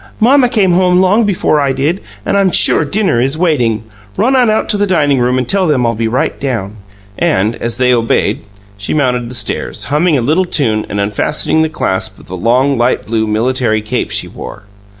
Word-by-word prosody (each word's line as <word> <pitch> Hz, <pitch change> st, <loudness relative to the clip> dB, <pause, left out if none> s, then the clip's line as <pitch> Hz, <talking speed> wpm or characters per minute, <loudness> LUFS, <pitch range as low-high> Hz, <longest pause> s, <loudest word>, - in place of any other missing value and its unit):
"Mamma 250 Hz, +2 st, +4 dB
came 205 Hz, -6 st, +2 dB
home 180 Hz, 0 st, +3 dB
long 200 Hz, +5 st, +3 dB
before 180 Hz, -6 st, +1 dB
I 140 Hz, -2 st, 0 dB
did, 150 Hz, +8 st, -1 dB, 0.2 s
and -, -, 0 dB
I'm 195 Hz, -1 st, +3 dB
sure 170 Hz, -, +4 dB
dinner 185 Hz, -, 0 dB
is 135 Hz, +4 st, 0 dB
waiting. 125 Hz, -, 0 dB, 0.3 s
Run 255 Hz, +5 st, +2 dB
on 250 Hz, -3 st, +3 dB
out 215 Hz, -, 0 dB
to 210 Hz, -, +1 dB
the 205 Hz, 0 st, 0 dB
dining 145 Hz, -7 st, +1 dB
room 125 Hz, +1 st, +1 dB
and 130 Hz, -2 st, -2 dB
tell 190 Hz, +2 st, +1 dB
them 135 Hz, -5 st, +1 dB
I'll 115 Hz, -, +1 dB
be 115 Hz, +1 st, -2 dB
right 120 Hz, +3 st, -1 dB
down." 110 Hz, -7 st, -4 dB, 0.4 s
And, 105 Hz, +5 st, +1 dB
as 120 Hz, 0 st, -4 dB
they 125 Hz, 0 st, +2 dB
obeyed, 115 Hz, -1 st, 0 dB, 0.4 s
she 100 Hz, -, -3 dB
mounted 125 Hz, -5 st, 0 dB
the 125 Hz, -, -8 dB
stairs, -, -, -2 dB
humming 155 Hz, 0 st, +2 dB
a -, -, 0 dB
little 155 Hz, +10 st, +1 dB
tune 110 Hz, -11 st, 0 dB
and 100 Hz, -, -3 dB
unfastening 105 Hz, +9 st, 0 dB
the 160 Hz, -, +1 dB
clasp 95 Hz, -11 st, -2 dB
of -, -, -16 dB
the 95 Hz, -, -7 dB
long, 125 Hz, +7 st, +1 dB
light 120 Hz, +1 st, 0 dB
blue 110 Hz, 0 st, -1 dB
military 110 Hz, 0 st, 0 dB
cape 110 Hz, -, -2 dB
she -, -, -1 dB
wore. 100 Hz, -, -10 dB
135 Hz, 210 wpm, -13 LUFS, 115-180 Hz, 0.4 s, Mamma